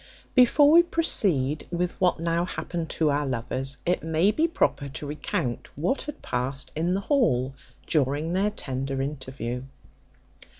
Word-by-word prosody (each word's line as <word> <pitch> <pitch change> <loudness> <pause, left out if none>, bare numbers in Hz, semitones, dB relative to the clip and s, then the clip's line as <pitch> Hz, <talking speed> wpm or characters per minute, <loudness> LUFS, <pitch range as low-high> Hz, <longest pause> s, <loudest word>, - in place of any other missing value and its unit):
Before 285 +3 +6
we 335 +2 +9
proceed 175 - +1
with 175 0 -1
what 180 -2 +3
now 165 +1 0
happened 170 -1 -4
to 155 -2 +1
our 145 +1 +1
lovers, 130 +2 -2
it 180 +1 +1
may 160 +5 +2
be 320 +8 +2
proper 145 - 0
to 150 +2 -7
recount 145 - -3
what 180 - 0
had 295 0 -8
past 130 +3 -2
in 170 +4 +1
the 195 - -1
hall 165 - +2 0.3
during 150 +2 0
their 195 +3 +2
tender 135 -7 -4
interview. 130 -3 -4
160 Hz, 145 wpm, -26 LUFS, 135-185 Hz, 0.3 s, we